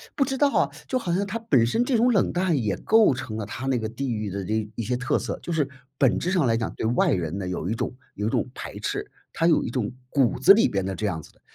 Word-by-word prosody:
不 280 Hz, -, +3 dB
知 270 Hz, 0 st, -2 dB
道 285 Hz, +1 st, +3 dB
啊， -, -, +3 dB, 0.2 s
就 255 Hz, -, 0 dB
好 180 Hz, -, -3 dB
像 190 Hz, +4 st, +1 dB
他 210 Hz, +3 st, -4 dB
本 140 Hz, -, +3 dB
身 125 Hz, -, +1 dB
这 245 Hz, -1 st, +1 dB
种 245 Hz, +2 st, +4 dB
冷 195 Hz, -, +2 dB
淡 180 Hz, -2 st, +1 dB
也 105 Hz, -2 st, -1 dB
构 220 Hz, -, +4 dB
成 115 Hz, -3 st, -6 dB
了 110 Hz, -, -3 dB
他 120 Hz, +5 st, -6 dB
那 135 Hz, -2 st, +1 dB
个 110 Hz, -1 st, -3 dB
地 125 Hz, +3 st, -3 dB
域 105 Hz, -2 st, -3 dB
的 100 Hz, +1 st, -4 dB
那 110 Hz, +2 st, -2 dB
一 115 Hz, -, -3 dB
些 125 Hz, +3 st, -1 dB
特 125 Hz, +1 st, 0 dB
色。 -, -, -4 dB
就 -, -, -5 dB
是 155 Hz, -4 st, +1 dB, 0.3 s
本 130 Hz, -4 st, +3 dB
质 180 Hz, -, -1 dB
上 180 Hz, -6 st, +2 dB
来 115 Hz, -2 st, +2 dB
讲， 115 Hz, -1 st, -2 dB
对 -, -, -3 dB
外 120 Hz, +3 st, +2 dB
人 85 Hz, -3 st, -1 dB
呢 95 Hz, -, -4 dB
有 90 Hz, -2 st, -3 dB
一 105 Hz, -, 0 dB
种 115 Hz, -, -3 dB, 0.2 s
有 105 Hz, +1 st, -2 dB
一 -, -, +1 dB
种 -, -, 0 dB
排 -, -, -8 dB
斥， -, -, -3 dB, 0.2 s
他 165 Hz, -, +1 dB
有 165 Hz, -, +4 dB
一 -, -, -3 dB
种 120 Hz, -5 st, -2 dB, 0.2 s
骨 135 Hz, -4 st, +2 dB
子 135 Hz, -, +8 dB
里 225 Hz, -, +4 dB
边 95 Hz, -2 st, -1 dB
的 95 Hz, -, -2 dB
这 105 Hz, -, -2 dB
样 85 Hz, -5 st, -2 dB
子 -, -, -16 dB
的。 -, -, -31 dB
125 Hz, 315 characters per minute, -25 LUFS, -, 0.3 s, 子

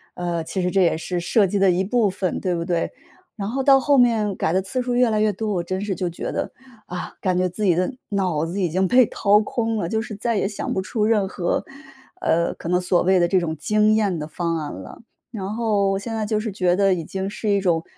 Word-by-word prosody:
"呃， 170 Hz, -2 st, -2 dB
其 185 Hz, +3 st, -3 dB
实 180 Hz, -, 0 dB
这 195 Hz, +1 st, +2 dB
也 170 Hz, -3 st, +3 dB
是 175 Hz, +2 st, -3 dB
设 200 Hz, +3 st, +3 dB
计 200 Hz, -, -1 dB
的 195 Hz, -1 st, +4 dB
一 180 Hz, +2 st, +1 dB
部 215 Hz, 0 st, +2 dB
分， 185 Hz, -1 st, -2 dB
对 180 Hz, -2 st, 0 dB
不 170 Hz, -1 st, -2 dB
对？" 170 Hz, -2 st, -1 dB, 0.5 s
然 200 Hz, 0 st, -3 dB
后 265 Hz, +2 st, -1 dB
到 270 Hz, -1 st, +6 dB
后 280 Hz, +1 st, +3 dB
面， 220 Hz, -5 st, +3 dB
改 -, -, -1 dB
的 190 Hz, -, +2 dB
次 195 Hz, +7 st, -3 dB
数 245 Hz, 0 st, -2 dB
越 245 Hz, -1 st, +3 dB
来 215 Hz, -1 st, +1 dB
越 215 Hz, -1 st, +3 dB
多， 210 Hz, +1 st, -2 dB
我 175 Hz, -2 st, -1 dB
真 185 Hz, +2 st, -3 dB
是 200 Hz, -3 st, -2 dB
就 180 Hz, 0 st, -2 dB
觉 170 Hz, -, -5 dB
得： -, -, -3 dB, 0.4 s
“啊， 180 Hz, 0 st, -6 dB
感 185 Hz, -2 st, +1 dB
觉 185 Hz, 0 st, +1 dB
自 210 Hz, +4 st, -5 dB
己 180 Hz, -4 st, +4 dB
的 180 Hz, +9 st, 0 dB, 0.2 s
脑 180 Hz, -6 st, 0 dB
子 190 Hz, +4 st, -3 dB
已 175 Hz, -, +1 dB
经 185 Hz, +3 st, +1 dB
被 250 Hz, +2 st, +5 dB
掏 205 Hz, 0 st, +3 dB
空 225 Hz, +1 st, -1 dB
了。” 170 Hz, -5 st, -2 dB
就 220 Hz, +2 st, 0 dB
是 220 Hz, -2 st, -7 dB
再 230 Hz, +2 st, -1 dB
也 195 Hz, -, +1 dB
想 205 Hz, -, -4 dB
不 190 Hz, -, -1 dB
出 210 Hz, +2 st, -1 dB
任 210 Hz, -3 st, +2 dB
何， 175 Hz, -2 st, -2 dB, 0.6 s
呃， 170 Hz, -, +1 dB
可 170 Hz, -, -7 dB
能 180 Hz, 0 st, +3 dB
所 180 Hz, -1 st, +2 dB
谓 185 Hz, 0 st, +3 dB
的 175 Hz, -, +3 dB
这 185 Hz, -, +3 dB
种 160 Hz, -3 st, -3 dB
惊 215 Hz, +6 st, +2 dB
艳 200 Hz, -6 st, +1 dB
的 150 Hz, -, -5 dB
方 165 Hz, +1 st, -2 dB
案 150 Hz, -2 st, -4 dB
了。 95 Hz, -, -10 dB, 0.3 s
然 200 Hz, -3 st, -5 dB
后 200 Hz, -4 st, +1 dB
现 225 Hz, +3 st, -5 dB
在 215 Hz, -1 st, -1 dB
就 215 Hz, 0 st, 0 dB
是 215 Hz, -1 st, -3 dB
觉 180 Hz, -2 st, +1 dB
得 195 Hz, -1 st, +3 dB
已 170 Hz, -, -3 dB
经 190 Hz, +2 st, -4 dB
是 215 Hz, 0 st, -4 dB
一 200 Hz, -1 st, +3 dB
种， 170 Hz, -3 st, +1 dB
195 Hz, 280 characters per minute, -22 LUFS, 180-215 Hz, 0.6 s, 到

